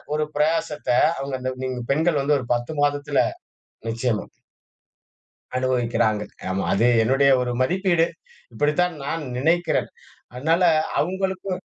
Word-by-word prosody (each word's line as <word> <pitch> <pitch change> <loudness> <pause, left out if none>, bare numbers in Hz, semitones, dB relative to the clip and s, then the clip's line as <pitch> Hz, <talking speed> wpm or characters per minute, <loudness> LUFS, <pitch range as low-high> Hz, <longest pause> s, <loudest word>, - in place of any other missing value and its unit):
ஒரு 155 0 0
பிரயாசத்த, 150 0 0 0.3
அவுங்க 135 0 -3
அந்த 130 0 -2
நீங்க 130 -1 -3
பெண்கள் 155 0 +1
வந்து 145 +1 +3
ஒரு 125 - -7
10 120 +6 -4
மாதத்தில 145 0 +1 0.6
நிச்சயமா. 115 -1 -1 1.3
அனுபவிக்கிறாங்க. 120 -4 +1 0.3
ஆமா. 95 +1 -1
அது 115 +4 +3 0.2
என்னுடைய 135 +4 +3
ஒரு 125 -1 -2
மதிப்பீடு. 175 +2 +2 0.5
இப்படித்தான் 150 +8 +1
நான் 160 +2 -3
நினைக்கிறேன். 170 +6 +1 0.5
அதனால 160 +7 +1 0.4
அவுங்களுக்கும் 190 +1 -2
145 Hz, 110 wpm, -23 LUFS, 125-165 Hz, 1.3 s, வந்து